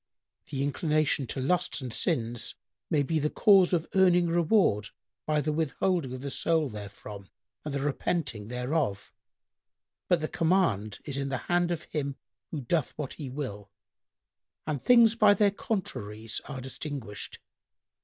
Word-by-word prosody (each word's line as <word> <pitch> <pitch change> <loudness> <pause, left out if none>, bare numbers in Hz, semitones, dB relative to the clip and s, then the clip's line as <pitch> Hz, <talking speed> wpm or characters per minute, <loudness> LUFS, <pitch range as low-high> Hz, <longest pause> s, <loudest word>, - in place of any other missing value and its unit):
"—"The 140 -2 -2
inclination 150 -1 +1
to 135 - -3
lusts 135 -3 0
and 125 -4 -5
sins 115 +1 -1 0.3
may 145 -2 +2
be 160 +3 0
the 150 +1 +1
cause 195 -2 +5
of 170 -3 +1
earning 180 -3 +4
reward 165 - +3 0.4
by 150 -1 +2
the 150 +1 -1
withholding 160 -1 0
of 130 - -8
the 140 0 -4
soul 160 +1 +2
therefrom 100 -1 -9 0.3
and 150 - -4
the 140 0 -2
repenting 135 -6 -1
thereof; 125 -3 -2 1.0
but 180 - +3
the 155 - -2
command[FN#105] 155 - +1
is 140 -2 -3
in 140 0 -2
the 135 - -1
hand 175 +5 +1
of 170 -3 -2
Him 140 -2 -3 0.3
who 150 - -4
doth 145 +3 -1
what 150 -3 -4
He 145 -4 -7
will, 105 -7 -5 1.0
and 150 -4 -2
things 235 -3 +6
by 210 -3 +5
their 205 0 +4
contraries 110 - -4
are 135 -3 -6
distinguished. 130 -5 -6
145 Hz, 150 wpm, -28 LUFS, 125-170 Hz, 1.0 s, things